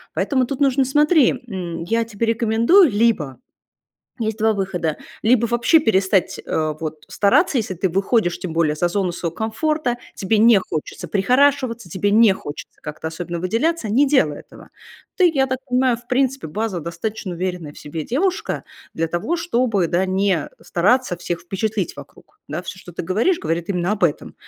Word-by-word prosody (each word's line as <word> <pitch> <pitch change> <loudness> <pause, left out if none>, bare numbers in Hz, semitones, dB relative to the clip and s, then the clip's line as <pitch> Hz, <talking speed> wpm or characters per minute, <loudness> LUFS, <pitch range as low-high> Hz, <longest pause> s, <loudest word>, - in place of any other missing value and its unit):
Поэтому 260 -3 +1
тут 275 +1 -4
нужно, 270 -1 +3
смотри, 295 +2 +4 0.2
м, 175 -6 -5
я 230 +6 0
тебе 225 0 -3
рекомендую 230 - +4
либо 205 - +1 0.8
есть 220 -1 -2
2 220 0 +3
выхода: 185 -6 -2 0.3
либо 235 +1 +3
вообще 240 +8 +4
перестать, 195 - +1
э, 155 -1 -1
вот 155 -1 -6
стараться, 275 - +2
если 220 -6 -1
ты 185 +2 0
выходишь, 195 0 +1
тем 180 - -5
более, 160 -2 +1
за 175 +3 0
зону 185 0 -1
своего 170 -1 -4
комфорта, 245 +5 -1 0.2
тебе 205 +3 +1
не 225 -1 +6
хочется 155 -5 -5
прихорашиваться, 250 +1 +2
тебе 190 +4 -1
не 215 0 +6
хочется 145 -5 -9
как-то 150 +1 -5
особенно 170 +1 -5
выделяться- 225 - 0
не 265 +7 +3
делай 155 - +2
этого. - - -16 0.5
Ты, 360 -2 +5
я 270 -3 +2
так 260 0 -2
понимаю, 250 -1 +2
в 240 +1 -18
принципе, 265 -3 0
базово 200 +2 -3
достаточно 180 +4 -5
уверенная 175 -3 -4
в - - -14
себе 155 +2 -6
девушка 360 +10 -1 0.3
для 165 - -1
того, 175 - -2
чтобы, 245 - +1
да, 175 +3 +1
не 190 -3 0
стараться 205 +3 +1
всех 175 0 -4
впечатлить 200 +1 -2
вокруг. - - -15
Да. 155 +3 -3
Всё, 185 0 -9
ты - - -5
говоришь, 215 - +1
говорит 165 +1 -2
именно 180 0 0
об 210 - -4
этом, 165 -4 0
205 Hz, 170 wpm, -21 LUFS, 175-250 Hz, 0.8 s, не